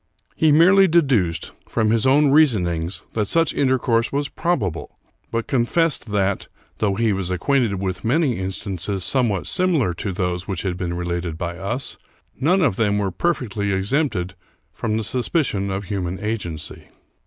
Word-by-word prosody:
He 160 -1 +3
merely 185 +6 +6
deduced, 135 - +1 0.2
from 110 -2 +1
his 115 +2 +2
own 140 +1 +4
reason 140 - +4
ings, 85 +1 -3
that 105 -2 0
such 165 +8 +2
intercourse 125 -4 +1
was 140 0 -1
probable, 110 - -2 0.3
but 115 0 -2
confessed 135 0 0
that, 100 -1 0 0.3
though 100 -2 +1
he 110 0 +1
was 95 -2 -2
acquainted 115 +3 +1
with 95 -1 -3
many 130 - +1
instances 95 0 -3
somewhat 115 -9 +1
similar 165 - +1
to 95 +4 -4
those 90 -1 -2
which 95 -4 -3
had 95 -2 -1
been 90 -1 -3
related 85 -2 -3
by 85 0 -4
us, 100 +8 -3 0.4
none 175 +8 +2
of 125 -11 +1
them 105 -3 +2
were 100 -2 -1
perfectly 105 - -1
exempted 95 - 0 0.4
from 110 -1 -2
the 110 - -2
suspicion 115 - -1
of 95 +1 -3
hu 100 0 -3
man 90 +1 -3
agency. 90 -7 -5
105 Hz, 160 wpm, -22 LUFS, 95-135 Hz, 0.4 s, merely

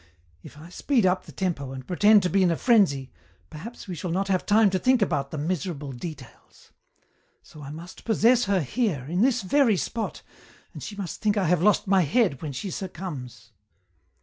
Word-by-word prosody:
If - - -13
I 160 +3 -12
speed 235 +4 0
up 185 0 +1
the - - -10
tempo 150 -8 -3
and 130 -1 -8
pretend 205 +4 +4
to 180 - +1
be 195 - +3
in 185 - +4
a 165 - 0
frenzy 180 - +2 0.4
perhaps 200 +11 -9
we 185 - -5
shall 175 +2 -5
not 195 +4 -1
have 185 -2 0
time 210 -1 +4
to 185 - 0
think 255 +3 +3
about 140 -9 0
the 155 - -6
miserable 155 -2 -3
details. 150 +4 -11 0.7
So 150 - -14
I 140 - -8
must 170 +5 -10
possess 235 +2 +3
her 195 -2 +1
here, 160 - -1
in 175 +5 -1
this 245 -2 +2
very 235 0 +3
spot, 225 +5 -4 0.5
and - - -9
she 210 - -7
must 195 -4 -6
think 210 0 +1
I 195 - +1
have 175 0 +2
lost 210 +3 +3
my 195 -1 +3
head 170 - +1
when 150 - -4
she 185 +8 -5
succumbs. 145 - -7
185 Hz, 200 wpm, -25 LUFS, 150-210 Hz, 0.7 s, pretend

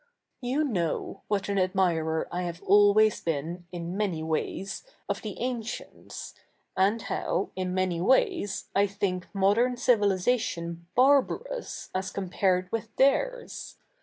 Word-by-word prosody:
' - - -52
You 265 +5 0
k7iow 175 - -2
what 200 -2 0
a7t 200 0 0
admirer 170 -4 +1
I 180 - -2
have 175 -1 -5
always 205 +2 +5
bee7i, 165 +2 -2
i7i 175 0 -5
ma7iy 190 -6 -1
ivays, 160 +4 -2 0.2
of - - -2
the 210 -3 -6
a7icients, 240 -1 -5 0.4
and 205 +4 +2
how, 195 - -1
i7i 185 -1 -2
77ia7iy 185 -2 0
ways, 265 - +2
I 200 +1 +4
think 195 -2 -2
7nodern 205 +6 +3
civilisatio7i 205 -6 +1 0.2
barba7'ous 285 - +2
as 185 0 -2
co7npared 185 -1 0
ivith 230 0 -2
theirs. - - +1
195 Hz, 130 wpm, -28 LUFS, 180-235 Hz, 0.4 s, always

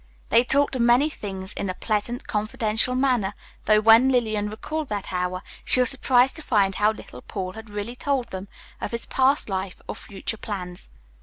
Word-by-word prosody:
They 230 +2 +5
talked 280 +2 +2
of 250 - 0
many 245 +6 +4
things 190 -6 -6
in 200 - -3
a 185 - -3
pleasant, 220 +4 -2
confidential 220 +2 0
manner, 250 -7 +1 0.3
though 215 0 +5
when 225 +4 +7
Lillian 220 -5 +1
recalled 305 +8 -4
that 205 -2 -4
hour, 180 0 -2 0.2
she - - +4
was 250 -2 +5
surprised 260 -1 +3
to - - -6
find 205 -9 +2
how 210 +2 +3
little 125 - -11
Paul 185 +3 -5
had 220 0 -10
really 210 +3 -5
told 270 -1 -1
them 190 +1 -6 0.3
of - - -2
his 235 - -2
past 270 +2 +2
life 190 -2 -4
or - - -3
future 205 +2 -5
plans. 180 -5 -6
220 Hz, 185 wpm, -24 LUFS, 200-250 Hz, 0.3 s, when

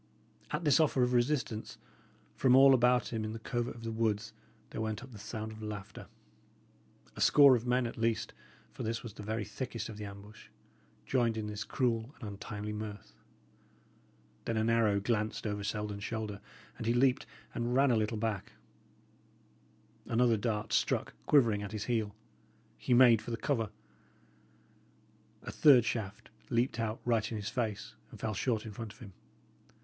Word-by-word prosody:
At 150 +3 -2
this 145 -2 +4
offer 140 -5 +3
of 125 0 +1
resistance, 120 -3 0 0.6
from 130 -1 +4
all 135 +1 +8
about 125 -1 +3
him 110 -1 -1
in 110 0 -4
the - - -5
covert 120 +1 -3
of 115 - -11
the 115 - -3
woods 110 -1 -1 0.4
there - - -4
went 110 +1 -3
up 135 - -12
the 110 - -11
sound 110 +1 -5
of 110 0 -10
laughter. 105 -1 -7 1.1
A - - -6
score 140 -3 +7
of 120 +1 -3
men, 125 0 +2
at 115 - -5
least, 115 -1 0 0.4
for - - -9
this 115 +1 -2
was 115 -4 -7
the 105 - -10
very 110 +1 -3
thickest 110 +1 -5
of 110 - -8
the 105 - -6
ambush, 100 +1 -11 0.6
joined 120 -4 +1
in 110 - -2
this 105 -1 -4
cruel 115 +3 -1
and 115 - -6
untimely 105 +1 -6
mirth. 105 -1 -7 1.3
Then 115 - -1
an 110 +1 +2
arrow 110 -3 +3
glanced 110 +1 -1
over 105 -1 -2
Selden's 105 -1 -3
shoulder; 110 -3 -4 0.4
and 115 - -4
he 120 - +2
leaped 130 +2 +3 0.3
and 120 +1 -1
ran 135 0 +5
a - - +4
little 110 0 0
back. 105 -3 -3 1.5
Another 120 0 +3
dart 105 0 -2
struck - - +1
quivering 115 -8 +4
at 100 +1 -6
his 105 -1 -3
heel. 110 -4 -1 0.6
He 125 - +1
made 120 -3 +7
for - - -8
the 115 - -2
cover. 115 -5 -1 1.7
A - - -6
third 130 -6 +6
shaft 110 -3 -4 0.2
leaped 120 0 +1
out 110 0 -2
right 115 -3 +1
in 110 - -2
his 105 +1 -4
face, 110 -4 -3 0.2
and - - -12
fell 110 - -2
short 115 0 -1
in 110 - -6
front 105 0 -7
of - - -20
him. 105 -7 -11
115 Hz, 175 wpm, -32 LUFS, 105-120 Hz, 1.7 s, all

